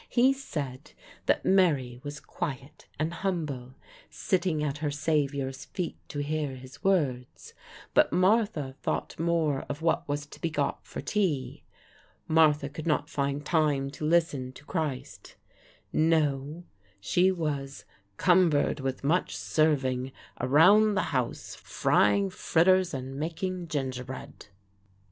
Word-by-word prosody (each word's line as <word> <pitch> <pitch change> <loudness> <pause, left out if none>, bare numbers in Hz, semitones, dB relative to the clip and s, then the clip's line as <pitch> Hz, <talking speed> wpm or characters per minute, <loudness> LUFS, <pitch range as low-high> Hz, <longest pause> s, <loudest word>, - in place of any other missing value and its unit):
He 255 +2 +4
said 145 - -6 0.3
that - - +2
Mary 145 -11 +2
was 145 +2 -7
quiet 135 0 -6
and 155 +3 -1
humble, 155 -9 -3 0.3
sitting 175 -6 0
at 145 -1 -2
her 150 -1 -1
Savior's 140 -2 -1
feet 180 -3 -4
to 145 -1 -3
hear 150 -2 -2
his 130 0 -13
words; 140 -11 -1 0.4
but - - +4
Martha 185 - +2
thought - - -3
more 165 -4 +1
of 145 +2 -5
what 165 - +1
was 145 0 -2
to 150 - -14
be 165 - 0
got 145 -3 -2
for - - -6
tea. 150 -3 -1 0.7
Martha 155 -3 +4
could 150 +3 -7
not 150 -1 0
find 140 +1 -2
time 145 -4 +1
to 145 - -9
listen 150 -5 +1
to 140 - -15
Christ. 155 -7 -4 0.6
No; 155 0 +1 0.4
she 180 - +3
was 145 -6 -3 0.3
"'cumbered 170 -6 +3
with 135 -1 -3
much 165 +6 +1
serving' 135 -4 +1 0.3
around 190 - +5
the 190 - -1
house, 125 -2 -2
frying 100 -2 +2
fritters 185 +2 +3
and 130 +1 -6
making 170 +3 -3
gingerbread." 130 -6 -5
150 Hz, 125 wpm, -28 LUFS, 135-170 Hz, 0.7 s, around